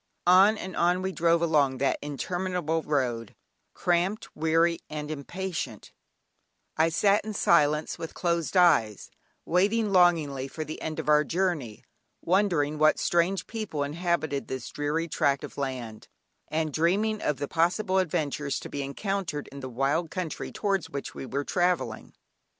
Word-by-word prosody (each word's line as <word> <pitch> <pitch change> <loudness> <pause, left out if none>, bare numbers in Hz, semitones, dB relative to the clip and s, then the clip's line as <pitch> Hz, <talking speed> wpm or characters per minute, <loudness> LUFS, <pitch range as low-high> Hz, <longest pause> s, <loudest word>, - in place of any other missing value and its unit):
On 190 +5 +6
and 190 -2 -6
on 180 +2 +2
we 190 - -1
drove 170 -1 +2
along 145 -5 +2
that 135 +1 0
interminable 170 +2 -2
road, 125 -8 -2 0.4
cramped, 180 +4 0
weary, 165 +2 +2
and 150 0 -5
impatient; 155 - -5 0.8
I 160 +1 +3
sat 200 +5 +3
in 215 -1 -6
silence 150 -4 +2
with 165 - -7
closed 170 0 0
eyes, 145 - +3 0.3
waiting 205 +5 +2
longingly 160 -8 +3
for 155 +3 -5
the 155 - -7
end 155 -1 -4
of - - -4
our 150 0 +5
journey, 160 - -2 0.4
wondering 170 -6 +1
what 155 0 +5
strange 175 +3 +1
people 215 -10 -3
inhabited 155 -2 -1
this 130 -1 -5
dreary 150 +3 -1
tract 140 -3 +1
of - - -8
land, 125 -6 -5 0.4
and 155 -1 -2
dreaming 205 +8 +1
of 150 - 0
the 145 +2 -3
possible 185 +4 +1
adventures 150 -5 -1
to - - -8
be 140 - -4
encountered 155 +2 -3
in 140 - -9
the 130 -1 -6
wild 135 +7 0
country 180 -2 -4
towards 195 -5 -1
which 140 -1 -6
we 130 - -7
were 140 +2 -2
travelling. 180 +2 -1
160 Hz, 150 wpm, -27 LUFS, 145-180 Hz, 0.8 s, On